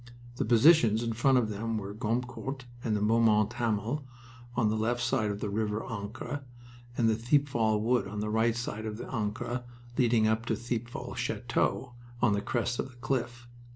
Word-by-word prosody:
The - - 0
positions 120 -3 +5
in 115 -1 -1
front 130 +4 +4
of 115 -3 +2
them 110 +2 -2
were 100 -1 -5
Gommecourt 125 +4 -3 0.2
and 110 -2 +1
Beaumont 110 -1 +4
Hamel 115 +5 -1 0.5
on 115 -3 +2
the - - 0
left 115 +3 0
side 120 -3 +1
of 100 0 -4
the 105 - -2
River 105 +1 -1
Ancre, 115 +5 -5 0.6
and 115 - +3
Thiepval 115 -1 +2
Wood 120 0 +1
on 105 +2 -5
the 105 0 -2
right 110 +1 +2
side 110 -2 -4
of 105 0 -4
the - - -6
Ancre 120 +2 -2 0.4
leading 115 -3 +4
up 110 +2 +1
to - - +1
Thiepval 120 0 -4
Chateau 130 -2 -1 0.3
on 120 -4 +3
the 100 - 0
crest 120 +1 -1
of - - -2
the 130 - -17
cliff. 120 -1 -2
115 Hz, 175 wpm, -30 LUFS, 110-120 Hz, 0.6 s, positions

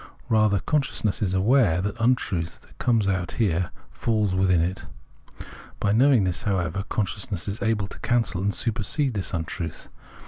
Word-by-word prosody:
Rather 110 -3 +3
consciousness 135 -6 0
is 95 -3 0
aware 100 -3 +3
that 100 +3 -2
the 115 - -5
untruth, 95 -9 0
that - - -21
comes 115 -5 +2
out 90 -3 -1
there, 90 -6 +1 0.2
falls 105 -4 0
within 95 -2 +3
it. 90 +4 -2 0.9
By 105 - +1
knowing 125 0 +5
this, 90 -2 -1
however, 95 -1 -1
consciousness 100 -2 -3
is 100 +2 -4
able 110 -3 +1
to 100 - -11
cancel 115 -6 0
and 100 +1 +1
supersede 115 +6 0
this 100 -3 -3
untruth. 85 -1 -4
100 Hz, 160 wpm, -25 LUFS, 90-115 Hz, 0.9 s, knowing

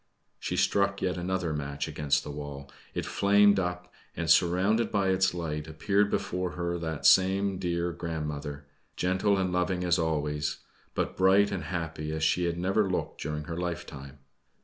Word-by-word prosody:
She - - -3
struck 100 0 +1
yet 90 -1 0
another 90 -2 -2
match 70 -1 -3
against 75 -2 0
the 75 - -6
wall. 70 -1 -7 0.2
It - - -2
flamed 100 0 +4
up, 90 -1 -4 0.2
and, - - +1
surrounded 95 +7 +3
by 100 -2 +1
its 95 0 +3
light, 80 -3 -4
appeared 100 +6 +1
before 90 -3 -2
her 85 0 -2
that 80 -2 -4
same 95 0 +4
dear 85 -1 -1
grandmother, 75 -3 -5 0.3
gentle 95 +3 +1
and 95 -1 0
loving 90 0 0
as 90 0 +2
always, 75 -2 -1 0.4
but - - -1
bright 95 +2 +4
and 90 -5 -3
happy 80 -2 -4
as 80 0 -2
she 85 +3 +2
had 85 0 -1
never 95 +3 +1
looked 90 - -3
during 75 +1 -3
her 85 +2 -6
lifetime. 80 -6 -5
85 Hz, 165 wpm, -28 LUFS, 75-95 Hz, 0.4 s, flamed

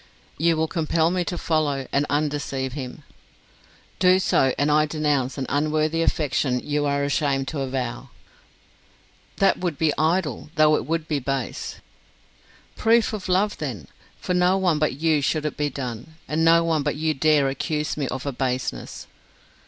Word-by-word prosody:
"You 165 0 +3
will 160 0 +1
compel 165 0 +1
me 180 -1 0
to 175 - -3
follow, 145 -4 0
and 140 +1 +2
undeceive 145 -3 -1
him." 135 +1 -7 1.0
"Do 185 0 +5
so, 135 -7 +2
and 145 +2 +2
I 150 +1 +4
denounce 145 -4 0
an 135 - -2
unworthy 155 +2 0
affection 135 -5 +1
you 145 +2 -1
are 140 0 0
ashamed 140 -1 0
to 155 - -4
avow." 130 -1 -3 1.3
"That 195 - +3
would 175 -5 -2
be 155 -1 +2
idle, 160 -1 0
though 155 0 +5
it - - -3
would 165 0 -1
be 150 -2 0
base." 135 -1 -4 0.9
"Proof 225 0 +3
of 200 -3 -5
love, 195 +3 +1
then! 115 - -5 0.3
For 180 - -2
no 180 +1 +3
one 180 -5 +1
but 150 -3 +1
you 160 -2 +2
should 155 +2 0
it 150 - -2
be 150 0 -1
done, 125 +2 -6
and 155 +2 0
no 165 +1 +5
one 165 -2 +1
but - - -1
you 155 +1 0
dare 150 -1 +3
accuse 150 +3 -2
me 145 -3 -2
of 130 +1 -5
a 140 - -1
baseness." 130 -1 -3
150 Hz, 170 wpm, -23 LUFS, 135-165 Hz, 1.3 s, Do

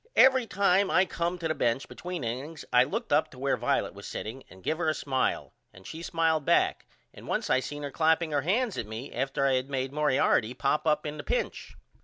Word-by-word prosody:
Every 260 -2 +6
time 195 -1 +3
I 185 - +4
come 175 0 -2
to 170 -2 -3
the 160 - 0
bench 120 -2 0
between 180 -4 -6
innings 135 +7 -5
I 125 +1 +6
looked 225 - -3
up 150 +2 +3
to - - -15
where 135 +1 +1
Violet - - 0
was - - -10
setting 125 +5 -6
and 95 0 -16
give 160 +1 -1
her 160 -2 +1
a 155 - 0
smile 130 -2 -1 0.2
and 95 0 -16
she 160 - -7
smiled 165 -2 +1
back - - +2 0.3
and - - -13
once - - -1
I - - +4
seen 145 +2 -6
her 140 - -4
clapping 160 +2 +2
her 145 -1 +1
hands 205 - 0
at 115 - -4
me 110 +6 -7
after 135 +2 -1
I 135 - +3
had 130 +1 0
made 135 -1 -2
Moriarty 135 -5 +2
pop 150 +3 0
up 150 0 +2
in 150 0 -4
the - - -6
pinch. - - -3
150 Hz, 230 wpm, -28 LUFS, 130-170 Hz, 0.3 s, Every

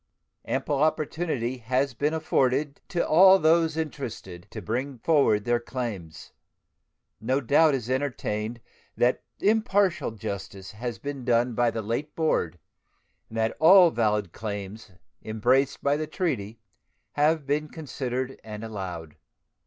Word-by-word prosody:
Ample 135 +2 -1
opportunity 155 -5 -1
has 130 +3 -1
been 150 +6 0
afforded 140 -1 0
to 170 - -1
all 190 +4 +7
those 160 -1 +3
interested 115 - -6
to - - -7
bring 130 +4 -3
forward 115 -6 +2
their 120 0 +2
claims. 110 - -6 0.9
No 130 +5 0
doubt 145 +3 +4
is 120 -4 -4
entertained 120 -4 -2 0.4
that 125 +1 +2 0.2
impartial 205 -3 +2
justice 100 -2 -7
has 115 0 -5
been 140 +2 -6
done 120 0 +2
by 120 +1 +2
the 115 -1 -4
late 120 +8 -3
board, 90 - 0 0.7
and 115 - -7
that 110 0 0
all 175 +1 +8
valid 105 - 0
claims 105 0 -6 0.3
embraced 125 +6 +1
by 140 0 +3
the 155 0 -3
treaty 115 - -3 0.5
have 150 0 +2
been 150 +2 0
considered 130 -4 -5
and 105 0 -8
allowed. 90 -8 -6
125 Hz, 130 wpm, -26 LUFS, 110-150 Hz, 0.9 s, all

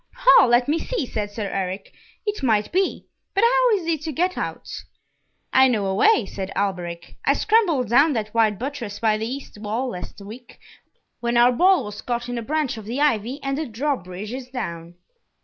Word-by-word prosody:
"Ha! - - +6
let 240 +1 +3
me 310 +3 +1
see," 485 - -2
said 210 -4 -4
Sir 210 +1 -5
Eric. 190 0 -4 0.3
"It 415 -4 -2
might 215 -5 +1
be. 375 +1 0 0.3
But 395 - +3
how - - +4
is 355 - -6
he 325 -2 0
to 310 +2 -5
get 360 +5 0
out?" - - -5 0.9
"I 265 0 +6
know 220 -6 0
a 190 - 0
way," 245 - +4
said 195 0 -6
Alberic. 175 -4 -3
"I - - +3
scrambled 350 - +2
down 280 +6 +5
that 215 -3 -3
wide 220 -3 +2
buttress 240 -5 -5
by 215 -2 +1
the 220 - -2
east 265 -4 -7
wall 225 +5 -2
last 180 -2 -8
week, 220 +5 -11 0.6
when 235 0 0
our 240 +1 +6
ball 360 +4 +4
was 210 -1 -7
caught 240 0 -3
in 245 -1 -3
a - - -4
branch 295 0 -1
of 220 - -9
the 240 +6 -4
ivy, 260 -2 +1
and 275 0 -1
the 315 - -3
drawbridge 215 - -4
is 255 -1 -6
down." 170 -9 -6
240 Hz, 200 wpm, -23 LUFS, 210-295 Hz, 0.9 s, Ha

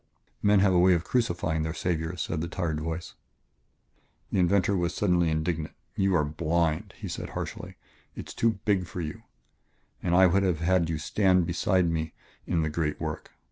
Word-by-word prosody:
"Men 100 -1 +4
have 95 -1 +4
a 90 - +4
way 90 0 +6
of 85 - -1
crucifying 85 -10 0
their 80 +1 -3
saviors," 85 0 -2
said 80 - -3
the 85 - -2
tired 85 -3 -2
voice. 80 +2 -5 1.2
The - - +1
inventor 100 +2 +3
was 85 -2 -1
suddenly 90 -4 +2
indignant. 80 0 -2 0.2
"You 95 -1 +2
are 75 -3 +3
blind," 85 +4 -1
he - - -6
said - - -5
harshly; - - -6 0.4
"it - - -7
is - - -7
too 115 -1 +2
big 95 -4 +1
for 90 - -7
you. 75 -2 -5 0.8
And 90 -1 +1
I 95 +1 +7
would 95 +2 +4
have 90 -4 0
had 85 -1 +2
you 80 - -1
stand 90 +3 +2
beside 90 +1 +1
me 80 -1 -2 0.3
in 80 -2 +1
the 75 - 0
great 75 -1 -1
work.... - - -5
85 Hz, 185 wpm, -27 LUFS, 80-95 Hz, 1.2 s, I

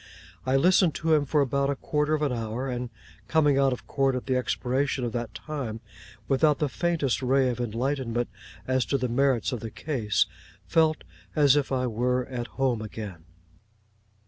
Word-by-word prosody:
I 130 - +3
listened 175 +3 +4
to 160 -1 +1
him 150 -2 +3
for 150 +2 +2
about 140 0 +1
a 140 - 0
quarter 150 +2 0
of 150 - -2
an 145 - +1
hour; 115 +2 -3
and, 125 -1 -3 0.4
coming 145 -3 +3
out 135 -1 +4
of 125 - -5
court 135 -2 +1
at 125 - -4
the 130 - 0
expiration 130 +1 0
of 120 - -1
that 120 -1 -4
time, 135 -8 -5 0.5
without 145 +1 +3
the 150 - 0
faintest 155 -6 0
ray 130 0 +3
of 125 - -3
enlightenment 120 +1 -1 0.4
as 130 -1 +2
to 140 - +1
the 125 -1 -1
merits 130 0 +1
of 125 - -3
the 115 - -6
case, 115 -5 0 0.4
felt 160 -1 +2 0.3
as 145 -3 +5
if 145 -2 0
I 130 -1 +1
were 125 +2 0
at 120 -2 -5
home 130 -4 +1
again. 105 -6 -7
130 Hz, 180 wpm, -27 LUFS, 120-145 Hz, 0.5 s, as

